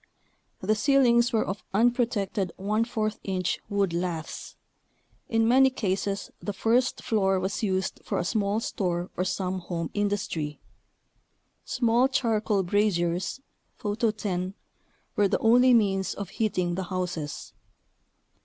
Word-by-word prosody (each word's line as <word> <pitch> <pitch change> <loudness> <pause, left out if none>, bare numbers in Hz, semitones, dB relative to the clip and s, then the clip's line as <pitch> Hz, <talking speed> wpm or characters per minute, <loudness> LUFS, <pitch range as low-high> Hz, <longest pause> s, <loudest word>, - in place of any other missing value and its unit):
The 205 +3 +2
ceilings 240 0 +4
were 225 - +1
of 190 0 -4
unpro 240 +2 +3
tected 200 -4 -2
14 215 +2 -1
inch 185 -3 -1
wood 200 -4 +1
laths. 170 -2 -4 0.7
In 225 0 +2
many 265 +3 +6
cases 200 -4 -2
the 205 - -4
first 235 +5 +1
floor 195 -4 +2
was 190 +2 -2
used 190 -3 -1
for - - -2
a 175 - -1
small 205 +1 0
store 175 -5 -2
or 180 - 0
some 185 0 -2
home 170 -2 -4
industry. 200 -7 -2 1.1
Small 240 +1 +3
charcoal 220 -6 +1
braziers 180 +2 0 0.3
(Photo 215 +2 0
10) 190 -3 -3 0.6
were 205 - +4
the 195 - +1
only 245 +3 +5
means 195 -5 +2
of 200 -3 -5
heating 185 -5 0
the 185 +1 -3
houses. 175 -5 -4
200 Hz, 125 wpm, -27 LUFS, 185-225 Hz, 1.1 s, many